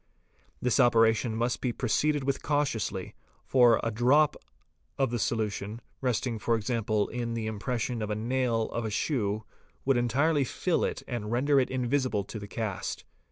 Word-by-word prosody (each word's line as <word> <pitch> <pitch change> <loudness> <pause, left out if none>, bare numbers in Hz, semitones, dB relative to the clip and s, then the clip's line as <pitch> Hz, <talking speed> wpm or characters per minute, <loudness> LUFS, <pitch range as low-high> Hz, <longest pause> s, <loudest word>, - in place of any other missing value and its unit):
This 125 +2 +1
operation 115 -2 +4
must 120 +2 -1
be 125 - 0
proceeded 145 +5 +1
with 135 0 -1
cautiously, 135 -10 -1 0.3
for 120 -3 +5
a 115 - 0
drop 130 +7 +4 0.6
of 135 -3 +1
the 120 - 0
solu 110 -2 0
tion, 105 +3 -6 0.2
resting 125 -2 -1
for 115 +2 +1
example 110 -2 0
in 115 -1 -3
the 115 -1 -2
impression 115 +2 -2
of 105 - -3
a 105 - -1
nail 120 0 0
of 115 - -2
a 110 - -2
shoe 105 -2 -1 0.4
would 135 -1 +3
entirely 140 +6 +2
fill 170 +6 0
it - - -2
and 115 -4 -4
render 140 +4 +3
it 130 - +1
invisible 130 -4 0
on 110 - -4
the 100 - -8
cast. 105 -4 -4
120 Hz, 165 wpm, -29 LUFS, 110-130 Hz, 0.6 s, for